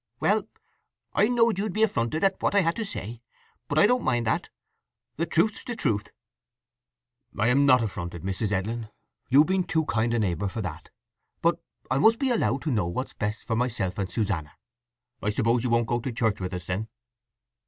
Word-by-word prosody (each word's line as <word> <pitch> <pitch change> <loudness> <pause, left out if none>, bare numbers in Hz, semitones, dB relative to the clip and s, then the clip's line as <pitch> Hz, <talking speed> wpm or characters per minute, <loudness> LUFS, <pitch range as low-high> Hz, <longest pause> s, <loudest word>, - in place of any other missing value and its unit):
"Well, - - +2 0.7
I 210 - +4
knowed 230 -4 +3
you'd 205 -2 -2
be 215 - +2
affronted 155 - 0
at 195 -1 +2
what - - +1
I 200 - +6
had 165 -1 +1
to 230 - -1
say; 115 - -6 0.5
but 145 - -2
I 155 - +7
don't 250 +3 +3
mind 120 -2 +1
that. - - 0 0.7
The 165 +2 -1
truth's 205 +6 +1
the 240 - -5
truth." 110 - -1 1.3
"I'm 125 +7 +3
not 125 -3 +6
affronted, 85 -5 -5
Mrs. 95 +2 -2
Edlin. 110 +3 -2 0.4
You've 140 +4 +6
been 185 +1 +1
too 160 -2 0
kind 115 -3 0
a - - +2
neighbour 100 -2 0
for 110 +4 -4
that. 85 -2 -7 0.5
But 170 0 +2 0.3
I 130 - +2
must 225 +9 +5
be 265 0 0
allowed 175 - +1
to 155 - -1
know 105 -8 +1
what's 130 +10 -4
best 105 +1 -3
for 115 - -1
myself 110 -6 -1
and 95 -2 -2
Susanna. 90 -8 -2 0.7
I 105 - 0
suppose 115 +3 +1
you 125 - 0
won't 115 0 +3
go 120 +1 0
to 125 +2 -4
church 110 -2 0
with 90 0 -3
us, 90 -2 -6
then?" 95 +5 -3
120 Hz, 195 wpm, -26 LUFS, 105-165 Hz, 1.3 s, I